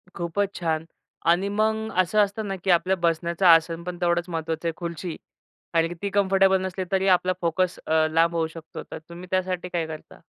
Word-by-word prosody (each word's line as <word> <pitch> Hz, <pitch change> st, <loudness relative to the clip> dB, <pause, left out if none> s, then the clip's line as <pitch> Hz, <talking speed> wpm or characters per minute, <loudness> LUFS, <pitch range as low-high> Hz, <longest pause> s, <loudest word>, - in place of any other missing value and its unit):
खूपच 190 Hz, +4 st, -1 dB
छान. 160 Hz, -2 st, -1 dB, 0.4 s
आणि 180 Hz, +4 st, +3 dB
मग 220 Hz, +1 st, 0 dB
असं 185 Hz, +4 st, 0 dB
असतं 205 Hz, +1 st, -3 dB
ना, 195 Hz, -, -2 dB
की 195 Hz, -, -2 dB
आपल्या 180 Hz, +2 st, +3 dB
बसण्याचं 170 Hz, +2 st, 0 dB
आसनपण 170 Hz, +1 st, +4 dB
तेवढंच 175 Hz, 0 st, +1 dB
महत्वाचं 165 Hz, 0 st, -3 dB
आहे, 165 Hz, -, -1 dB
खुर्ची 170 Hz, -1 st, -5 dB, 0.6 s
आणि 165 Hz, +1 st, +2 dB
ती 200 Hz, -, -1 dB
कम्फर्टेबल 195 Hz, -1 st, +3 dB
नसली, 190 Hz, 0 st, -3 dB
तरी 190 Hz, 0 st, +2 dB
आपला 185 Hz, 0 st, +3 dB
फोकस 175 Hz, +1 st, 0 dB
अ, 160 Hz, 0 st, +3 dB
लांब 165 Hz, +1 st, +3 dB
होऊ 165 Hz, -1 st, +1 dB
शकतो, 160 Hz, 0 st, -9 dB
तर -, -, -5 dB
तुम्ही 175 Hz, +2 st, -9 dB
त्यासाठी 185 Hz, -1 st, -1 dB
काय 170 Hz, -2 st, -1 dB
करता? 155 Hz, -1 st, -10 dB
175 Hz, 180 wpm, -25 LUFS, 165-190 Hz, 0.6 s, आसनपण